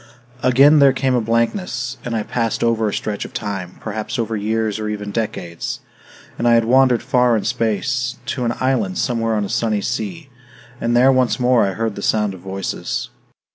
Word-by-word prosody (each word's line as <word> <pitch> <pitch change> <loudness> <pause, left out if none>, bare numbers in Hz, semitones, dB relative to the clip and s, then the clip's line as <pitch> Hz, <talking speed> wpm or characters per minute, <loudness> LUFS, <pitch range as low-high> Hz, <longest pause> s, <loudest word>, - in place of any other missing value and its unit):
III - - +4
Again 140 +4 +6
there 140 -2 +6
came 130 0 0
a 125 - +2
blankness, 120 - -1
and 120 -2 -3
I 110 - -1
passed 115 +1 -1
over 115 -2 +2
a - - -5
stretch 105 -2 -3
of - - -10
time, 95 -4 -4
perhaps 110 +3 -4
over 115 -1 -1
years 110 0 -1
or 105 0 -3
even 105 -1 -4
decades. 90 -6 -4 0.6
And 120 - +1
I 120 - +6
had 115 -1 +3
wandered 125 0 +4
far 125 -2 +3
in 105 - -3
space, 120 +2 -1
to 125 - -3
an 120 0 0
island 135 +9 0
somewhere 115 -3 0
on 105 -1 0
a - - -4
sunny 110 -2 0
sea; 160 - -4 0.5
and 120 +1 +1
there 130 +2 +6
once 130 0 +2
more 125 -1 +4
I 95 - -2
heard 110 +1 -2
the 100 - -6
sound 105 -1 +1
of 95 - -10
voices. 95 +1 -4
115 Hz, 200 wpm, -20 LUFS, 105-125 Hz, 0.6 s, Again